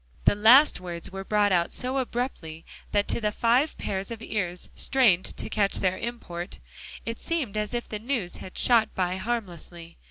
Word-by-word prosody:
The -, -, +6 dB
last 235 Hz, +8 st, +6 dB
words 175 Hz, -1 st, -4 dB
were 195 Hz, 0 st, -6 dB
brought 205 Hz, 0 st, +2 dB
out 170 Hz, -2 st, +2 dB
so 260 Hz, +1 st, -2 dB
abruptly, 235 Hz, -11 st, -4 dB, 0.3 s
that 205 Hz, 0 st, +1 dB
to -, -, -1 dB
the 210 Hz, -1 st, +1 dB
five 245 Hz, +8 st, +2 dB
pairs 195 Hz, 0 st, -3 dB
of 230 Hz, -1 st, -7 dB
ears 180 Hz, -6 st, -3 dB
strained 225 Hz, -10 st, +3 dB
to -, -, -3 dB
catch 200 Hz, -2 st, +1 dB
their 185 Hz, -1 st, 0 dB
import, 200 Hz, -7 st, -5 dB, 0.5 s
it 230 Hz, 0 st, -4 dB
seemed 295 Hz, -11 st, -2 dB
as 210 Hz, +2 st, -2 dB
if 240 Hz, -, -3 dB
the 210 Hz, -, -5 dB
news 225 Hz, -6 st, -3 dB
had 185 Hz, -, -10 dB
shot 230 Hz, -3 st, +3 dB
by 185 Hz, 0 st, 0 dB
harmlessly. 175 Hz, -6 st, -5 dB
210 Hz, 180 wpm, -26 LUFS, 185-240 Hz, 0.5 s, The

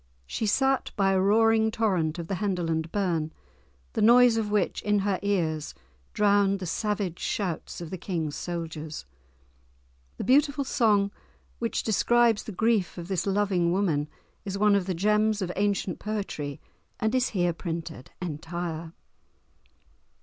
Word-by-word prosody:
She 220 Hz, -, -2 dB
sat 270 Hz, +5 st, +2 dB
by 195 Hz, -1 st, +2 dB
a 190 Hz, -1 st, +2 dB
roaring 220 Hz, +2 st, +4 dB
torrent 185 Hz, -8 st, 0 dB
of 170 Hz, -, -4 dB
the 190 Hz, +2 st, -3 dB
Henderland 165 Hz, -5 st, -1 dB
burn, 170 Hz, -6 st, 0 dB, 0.6 s
the 220 Hz, -, -1 dB
noise 240 Hz, +2 st, +7 dB
of 220 Hz, -2 st, -1 dB
which 205 Hz, -2 st, 0 dB
in 210 Hz, 0 st, +1 dB
her 195 Hz, -2 st, 0 dB
ears 160 Hz, -, -1 dB, 0.4 s
drowned 200 Hz, -1 st, +3 dB
the 190 Hz, -, -6 dB
savage 200 Hz, 0 st, -2 dB
shouts 180 Hz, -4 st, -3 dB
of 170 Hz, -, -7 dB
the 185 Hz, -, -5 dB
King's 165 Hz, -5 st, -3 dB
soldiers. 160 Hz, -, -5 dB, 1.1 s
The -, -, -4 dB
beautiful 280 Hz, +4 st, +3 dB
song 210 Hz, -6 st, +2 dB, 0.5 s
which 230 Hz, -1 st, -1 dB
describes 230 Hz, +1 st, +3 dB
the -, -, -6 dB
grief 215 Hz, -2 st, +1 dB
of 170 Hz, +1 st, -7 dB
this 190 Hz, 0 st, -1 dB
loving 195 Hz, -4 st, +1 dB
woman 165 Hz, -6 st, 0 dB, 0.3 s
is 195 Hz, 0 st, -4 dB
one 210 Hz, 0 st, +4 dB
of 195 Hz, -2 st, +1 dB
the 185 Hz, -, -1 dB
gems 210 Hz, +3 st, +2 dB
of 185 Hz, -3 st, -2 dB
ancient 200 Hz, -2 st, 0 dB
poetry, 195 Hz, -10 st, -4 dB, 0.4 s
and 220 Hz, +2 st, 0 dB
is 255 Hz, -1 st, +2 dB
here 175 Hz, -4 st, +1 dB
printed 165 Hz, -5 st, -6 dB
entire. 165 Hz, 0 st, -5 dB
195 Hz, 145 wpm, -27 LUFS, 170-215 Hz, 1.1 s, noise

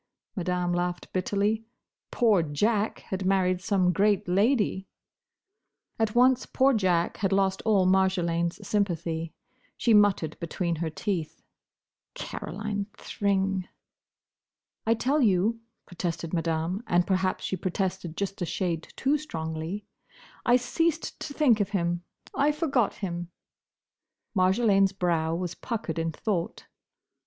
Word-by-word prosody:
Madame 180 Hz, -2 st, -1 dB
laughed 175 Hz, 0 st, -2 dB
bitterly. 205 Hz, +4 st, 0 dB, 0.5 s
"Poor 220 Hz, -7 st, +3 dB
Jack 205 Hz, +8 st, 0 dB
had 190 Hz, 0 st, -2 dB
married 185 Hz, -1 st, +2 dB
some 185 Hz, -3 st, +2 dB
great 200 Hz, +1 st, +2 dB
lady!" 200 Hz, 0 st, +2 dB, 1.1 s
At 220 Hz, -1 st, 0 dB
once 255 Hz, +1 st, +4 dB
poor 270 Hz, +1 st, +3 dB
Jack 180 Hz, -6 st, +1 dB
had 195 Hz, -2 st, 0 dB
lost 195 Hz, -1 st, +2 dB
all 200 Hz, -4 st, +4 dB
Marjolaine's 185 Hz, 0 st, +1 dB
sympathy. 165 Hz, -5 st, -1 dB, 0.5 s
She 235 Hz, -, +3 dB
muttered 200 Hz, -7 st, +3 dB
between 170 Hz, 0 st, -2 dB
her 165 Hz, 0 st, -2 dB
teeth, 170 Hz, -1 st, -3 dB, 0.7 s
"Caroline 205 Hz, -1 st, -4 dB
Thring." 195 Hz, -2 st, -1 dB, 1.2 s
"I 230 Hz, -, +4 dB
tell 275 Hz, +6 st, +1 dB
you," 215 Hz, +1 st, +2 dB, 0.3 s
protested 170 Hz, -2 st, -4 dB
Madame—and 175 Hz, +3 st, 0 dB
perhaps 185 Hz, 0 st, 0 dB
she -, -, -1 dB
protested 185 Hz, -2 st, -3 dB
just 195 Hz, -1 st, -3 dB
a -, -, +1 dB
shade 170 Hz, -4 st, -2 dB
too 285 Hz, +3 st, +1 dB
strongly—"I 180 Hz, -, -4 dB
ceased 320 Hz, +6 st, 0 dB
to 305 Hz, -, -6 dB
think 280 Hz, -7 st, +3 dB
of 205 Hz, -2 st, 0 dB
him. 170 Hz, 0 st, -1 dB, 0.3 s
I 290 Hz, +2 st, +3 dB
forgot 280 Hz, -, +1 dB
him." 175 Hz, -3 st, -4 dB, 1.1 s
Marjolaine's 195 Hz, +1 st, +3 dB
brow 165 Hz, -3 st, 0 dB
was 175 Hz, 0 st, -3 dB
puckered 205 Hz, -9 st, -4 dB
in 165 Hz, 0 st, -1 dB
thought. 175 Hz, +1 st, -3 dB
190 Hz, 115 wpm, -27 LUFS, 175-210 Hz, 1.2 s, once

